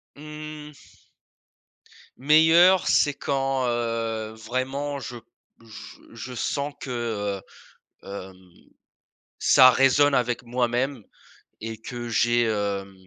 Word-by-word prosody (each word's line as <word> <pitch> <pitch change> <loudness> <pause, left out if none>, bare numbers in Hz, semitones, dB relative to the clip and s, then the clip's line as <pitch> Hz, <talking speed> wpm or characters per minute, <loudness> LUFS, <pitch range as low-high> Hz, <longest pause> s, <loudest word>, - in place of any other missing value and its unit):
Mmh. 150 0 -11 1.1
Meilleure 160 +6 +5
c'est 145 -1 +3
quand, 135 -2 -1
heu, 115 -2 -2
vraiment 135 +5 -3
je 125 -1 -7
p - - -16 0.4
je 110 -2 -12 0.2
je 115 +3 -8
sens 140 +4 -2
que, 110 -7 -3 0.6
heu, - - -14
hem, 95 -2 -10 0.9
ça 130 -1 +7
résonne 135 +3 +4
avec 120 -1 0
moi-même 125 +1 -1 0.6
et 110 0 -7
que 120 +1 -7
j'ai, 120 +1 +2
hem, 100 -3 -2
120 Hz, 100 wpm, -24 LUFS, 110-140 Hz, 1.1 s, ça